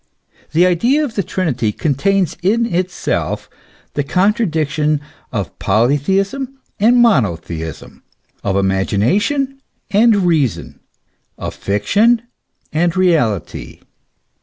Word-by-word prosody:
The 170 +3 +5
idea 235 - +2
of 250 - -6
the 205 - 0
Trinity 140 - -1
contains 170 - 0
in 220 +6 +2
itself 180 -4 -2 0.5
the 145 - -1
contradiction 160 -5 +1 0.3
of 100 -7 -4
polytheism 190 - 0 0.2
and 235 +4 +4
monotheism, 85 - 0 0.4
of 95 - 0
imagination 175 - 0 0.3
and 220 +2 +5
reason, 165 - 0 0.6
of - - -5
fiction 215 - +2 0.5
and 170 +3 +1
reality. 150 - 0
175 Hz, 90 wpm, -17 LUFS, -, 0.6 s, The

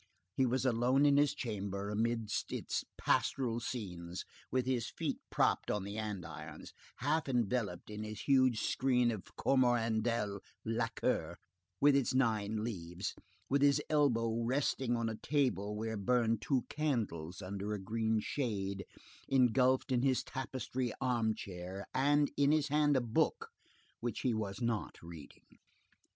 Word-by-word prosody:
He 130 +4 +2
was 130 +2 0
alone 125 +3 +3
in 140 -1 +5
his 145 -1 +3
chamber, 100 -3 -3
amid 115 0 0 0.2
its - - -2
pastoral 120 -4 +1
scenes, 90 -8 -5 0.2
with 130 0 0
his 125 -3 0
feet - - -3
propped - - +2
on 105 -2 0
the 100 +1 -6
andirons, 80 -7 -6 0.3
half 150 +2 +1
enveloped 115 -6 -1
in 105 0 -5
his 105 -1 -6
huge 130 -5 +3
screen 125 -2 +2
of 105 -5 -7
coromandel 115 -5 +2 0.3
lacquer, 115 -6 -1 0.4
with 145 -1 +6
its 130 -2 +2
nine 110 -4 +1
leaves, 90 -4 -4 0.3
with 140 +1 +2
his 145 0 +5
elbow 115 -7 +2
resting 125 0 +1
on 115 -1 -1
a 110 - -2
table 125 -9 0
where 110 +1 -3
burned 115 +1 +2
two 125 +4 +1
candles 110 - -2
under 100 +2 -4
a 105 - -3
green 110 +2 0
shade, 100 -6 -2 0.4
engulfed 130 +1 +3
in 125 -2 +3
his 130 -1 +2
tapestry 130 -1 -3
armchair, 105 -7 -2
and 145 +2 +3
in 145 0 +4
his 150 -2 +2
hand 145 -1 +3
a - - +2
book 115 -2 0 0.5
which 120 0 -3
he 125 - +1
was 110 +1 -3
not 115 -3 -1
reading. 85 -4 -11
115 Hz, 140 wpm, -34 LUFS, 105-130 Hz, 0.5 s, with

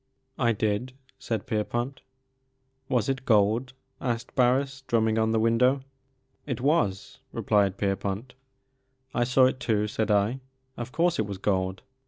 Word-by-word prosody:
"Idid/*saidPierpont. 120 +1 -2 0.9
"Was 125 -5 +1
it 135 -1 -1
gold?" 115 +3 +2 0.3
asked 120 -2 -3
Bams, 130 +1 +2
drumming 110 -1 +2
on 110 0 +2
the 110 - +2
window. 125 +4 +3 0.6
It 130 -5 -2
was," 125 - 0
replied 100 -2 +1
Kerpont. 100 +4 -2 0.8
I 120 - +2
saw 125 +2 +4
it 130 0 +1
too," 105 -3 +1
said 110 +1 -2
I; 105 +5 +2 0.4
of 120 +1 -6
course, 170 +1 +1
it 110 - +1
was 100 -1 -5
gold." 95 -1 -1
115 Hz, 125 wpm, -27 LUFS, 105-130 Hz, 0.9 s, saw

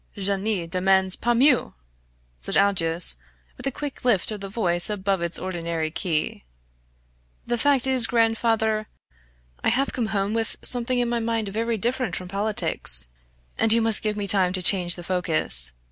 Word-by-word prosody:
"Je 200 0 -1
ne 195 -3 -2
demands 190 +2 +1
pas 240 0 -1
mieux!" 265 0 +3 0.7
said - - -3
Aldous 170 - +3 0.4
with - - -4
a - - 0
quick 285 +1 -7
lift 225 -6 +1
of 210 -2 -6
the 195 - -6
voice 175 -5 +1
above 195 -3 -2
its 170 0 -2
ordinary 170 -3 -4
key. 160 - -3 1.0
"The 240 - -2
fact 275 -1 +2
is, 260 -3 +6
grandfather, 225 -2 0 0.8
I - - +2
have 265 +4 -1
come 235 -3 -2
home 205 -1 -2
with 225 -1 -1
something 245 0 +1
in 245 -1 0
my 235 0 -1
mind 225 -2 -2
very 225 +3 -2
different 240 - -2
from 180 +2 -5
politics 195 - -1 0.5
and 225 - +2
you 230 - +5
must 225 -2 +1
give 210 -1 -2
me 205 - -2
time 190 -2 +6
to 185 - -1
change 175 -2 +4
the 175 - -9
focus. 180 - 0
205 Hz, 170 wpm, -23 LUFS, 180-230 Hz, 1.0 s, is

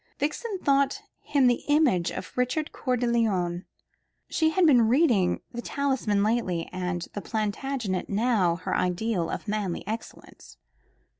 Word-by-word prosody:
Vixen 385 +9 -2
thought 280 +4 +1 0.2
him 280 -3 +1
the 245 -1 +2
image 290 - +3
of 180 - -7
Richard 250 +5 -1
Coeur 255 -2 -1
de 245 - -1
Lion. 190 -7 0 0.7
She 320 -1 +2
had 350 +3 +3
been 245 -7 +5
reading 235 - +3
"The 240 - -5
Talisman" 255 -8 0
lately, 205 -7 0
and 180 -1 -2
the 205 - -4
Plantagenet 215 -1 -2
was 200 -5 +1
her - - -2
ideal 180 0 0
of - - -5
manly 205 -4 -2
excellence. 220 +3 -8
230 Hz, 140 wpm, -26 LUFS, 185-275 Hz, 0.7 s, been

